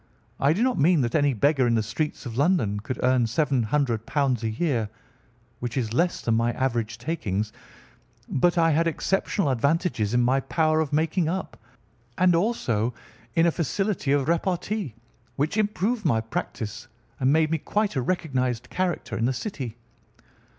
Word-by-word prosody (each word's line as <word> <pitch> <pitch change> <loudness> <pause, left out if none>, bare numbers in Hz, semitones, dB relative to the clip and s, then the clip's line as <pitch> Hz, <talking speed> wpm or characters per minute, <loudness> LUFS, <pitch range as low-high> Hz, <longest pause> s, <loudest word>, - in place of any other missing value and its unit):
I 140 +3 +4
do 205 +8 0
not 255 -1 +1
mean 160 +1 +4
that 120 -1 -1
any 145 -2 +3
beggar 135 +2 +3
in 115 - +2
the 110 - +1
streets 145 +8 -3
of 115 -2 -6
London 135 - +2
could 125 +5 -5
earn 125 -1 +3
£ - - -3
700 130 -3 +1 0.4
a 110 - 0
year—which 115 -2 -5
is 115 -4 -1
less 175 +7 +1
than 115 - 0
my 115 +1 +2
average 120 -3 -1
takings—but 120 - -3
I 165 -1 +4
had 165 +2 +2
exceptional 195 0 0
advantages 130 - 0
in 120 - +4
my 130 +3 +3
power 155 +3 +1
of 155 -3 -1
making 160 +2 +1
up, 190 +2 -3 0.6
and 180 0 +4
also 125 - 0 0.4
in 165 - +4
a 170 - +4
facility 175 0 -1
of 140 -1 +2
repartee, 175 - -1 0.4
which 150 +7 -1
improved 215 +2 0
by 135 -10 +2
practice 110 +2 -5 0.3
and 130 +1 +3
made 155 +1 +3
me 165 - +1
quite 210 +3 -1
a 130 - +1
recognised 130 -6 -1
character 185 -2 -2
in 115 - 0
the 130 - +1
City. 130 - -5
140 Hz, 160 wpm, -25 LUFS, 120-170 Hz, 0.6 s, I